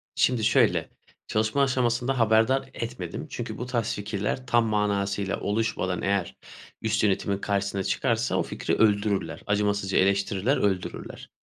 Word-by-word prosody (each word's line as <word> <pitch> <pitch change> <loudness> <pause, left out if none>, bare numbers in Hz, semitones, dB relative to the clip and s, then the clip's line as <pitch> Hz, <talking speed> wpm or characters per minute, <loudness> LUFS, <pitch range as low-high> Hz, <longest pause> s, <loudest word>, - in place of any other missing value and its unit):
Şimdi 120 -3 +2
şöyle, - - +3 0.4
çalışma 110 +5 +1
aşamasında 125 0 +1
haberdar 115 +4 +3
etmedim. 115 -7 -5
Çünkü - - -5
bu 125 - -4
tarz 120 -3 -1
fikirler 105 +5 -3
tam 120 -1 +3
manasıyla 100 -2 0
oluşmadan 100 -4 -1
eğer 100 -2 -1 0.4
üst 110 -1 0
yönetimin 100 -1 +1
karşısına 100 -1 -1
çıkarsa - - 0
o - - +2
fikri - - -2
öldürürler. 105 -2 +1
Acımasızca 100 -1 +1
eleştirirler, 100 +5 +2
öldürürler. 95 -3 -3
105 Hz, 125 wpm, -26 LUFS, 100-115 Hz, 0.4 s, şöyle